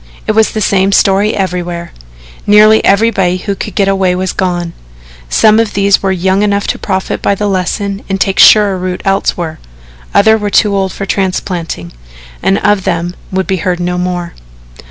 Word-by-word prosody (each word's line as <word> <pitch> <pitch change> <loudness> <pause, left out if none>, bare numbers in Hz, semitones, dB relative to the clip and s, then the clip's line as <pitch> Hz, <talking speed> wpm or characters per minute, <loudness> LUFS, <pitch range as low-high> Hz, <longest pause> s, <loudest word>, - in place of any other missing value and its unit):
It - - 0
was 220 0 +3
the 215 - -2
same 195 -1 +1
story 200 +2 +2
everywhere. 175 -2 -4 0.6
Nearly 215 +1 +5
everybody 195 -3 +2
who 200 +2 -3
could 195 0 -7
get 200 - +1
away 190 -2 +1
was 185 0 -2
gone. 175 -2 -2 0.6
Some 215 - +4
of 225 -2 -1
these 200 0 +2
were 195 - 0
young 190 +2 0
enough 205 -1 0
to - - -2
profit 190 -2 -3
by 200 - +1
the 205 +1 -2
lesson 195 +1 -2
and 195 0 -2
take 195 0 0
surer 205 -3 +6
root 180 0 -4
elsewhere 175 -4 -1 0.5
others 220 +2 +3
were 205 - -1
too 205 0 +2
old 190 -1 -1
for 195 - -5
transplanting, 180 - -3 0.5
and 195 - +1
of 205 -2 +2
them 175 +1 -2 0.2
would 190 0 -1
be 190 - -1
heard 180 +1 -2
no 180 0 -2
more. 180 -1 -3
195 Hz, 175 wpm, -12 LUFS, 180-205 Hz, 0.6 s, surer